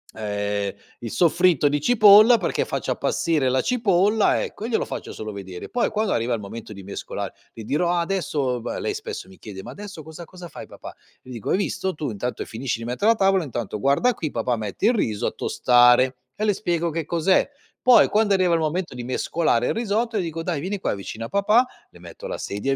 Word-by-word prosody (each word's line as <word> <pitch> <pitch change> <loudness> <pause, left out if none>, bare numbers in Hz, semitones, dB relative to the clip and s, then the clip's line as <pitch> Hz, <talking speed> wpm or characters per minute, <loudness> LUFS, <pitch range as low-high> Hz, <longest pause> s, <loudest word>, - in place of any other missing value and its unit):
ehm, 105 -2 -2 0.3
il 115 -2 -6
soffritto 170 -3 +3
di 145 +1 0
cipolla 215 +3 +7
perché - - -1
faccio - - -3
appassire 155 -5 0
la 130 +1 +2
cipolla", 210 -3 +2
ecco, 210 - -6
e - - -4
glielo 230 - +1
faccio - - -7
solo 110 0 -6
vedere. 95 -3 -8
Poi, 245 - 0
quando 215 -1 0
arriva 115 +2 0
il 115 - -2
momento 105 +2 -8
di 100 -1 -10
mescolare, 100 - -5 0.2
le 115 - -9
dirò: 160 +10 0
"Ah, 175 -1 +1
adesso..." 150 -8 -1
b - - -14
lei 425 - -2
spesso 435 - -7
mi 190 - -16
chiede: 95 -3 -9
"Ma 120 - -8
adesso 195 +1 -9
cosa 160 +3 -10
cosa 180 0 -11
fai, - - -9
papà?". - - -11 0.3
Le 130 - -12
dico: 115 -4 -6
"Hai - - +3
visto? 190 -1 -2
Tu 150 -2 -3
intanto 120 +4 -4
finisci 115 +1 -4
di - - -7
mettere 125 - +2
la - - +2
tavola, 195 -2 +3
intanto 115 -5 -4
guarda 140 - +2
qui, 155 -8 -4
papà 120 +1 -1
mette 110 - -2
il 240 - +4
riso 110 - -1
a - - -1
tostare", 125 +1 +4 0.2
e 215 - -4
le 210 - +3
spiego 170 -4 -1
che 165 0 -3
cos'è. 170 - +2 0.3
Poi, 250 -1 +6
quando 210 -1 +2
arriva 185 -2 +2
il - - +1
momento 160 -1 -2
di 125 - -6
mescolare 125 0 0
il - - +1
risotto, 225 0 -1
dico: 165 -4 -3
"Dai, 165 -5 -2
vieni 195 +4 -3
qua - - -1
vicino 110 +3 -6
a - - -8
papà". 210 +5 +3 0.3
Le - - -17
metto - - -10
la - - -4
sedia 135 +7 -2
160 Hz, 220 wpm, -23 LUFS, 120-200 Hz, 0.3 s, cipolla